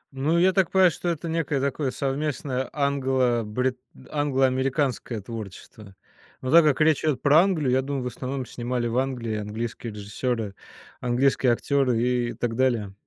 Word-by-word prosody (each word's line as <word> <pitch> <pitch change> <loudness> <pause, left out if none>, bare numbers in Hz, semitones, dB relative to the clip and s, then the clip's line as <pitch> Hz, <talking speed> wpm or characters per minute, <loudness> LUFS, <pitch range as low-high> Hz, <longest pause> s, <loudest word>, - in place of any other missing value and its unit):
Ну, 150 +6 +1
я 185 +2 +4
так 190 -3 +2
понимаю, 190 -2 +5
что 175 - -3
это 170 0 -3
некое 160 -4 -1
такое 140 +1 -1
совместное 135 -1 -2
англо-бри 130 -4 0 0.4
англо-американское 135 -3 0
творчество, 105 -1 -9 0.5
но 130 - -3
так 170 +1 +8
как 150 -4 +2
речь 155 -2 +3
идет 150 -5 +1
про 145 +2 +6
Англию, 165 -9 +1
я 130 +1 +3
думаю, 140 -1 -3
в - - -3
основном 130 +1 -4
снимали 120 0 -3
в 115 - -2
Англии 120 -5 -2
английские 110 +2 -5
режиссеры, 105 +1 -3 0.5
английские 125 +1 +2
актеры 125 -1 +1
и 120 0 0
так 120 -2 -3
далее. 115 -6 0
130 Hz, 150 wpm, -25 LUFS, 120-145 Hz, 0.5 s, так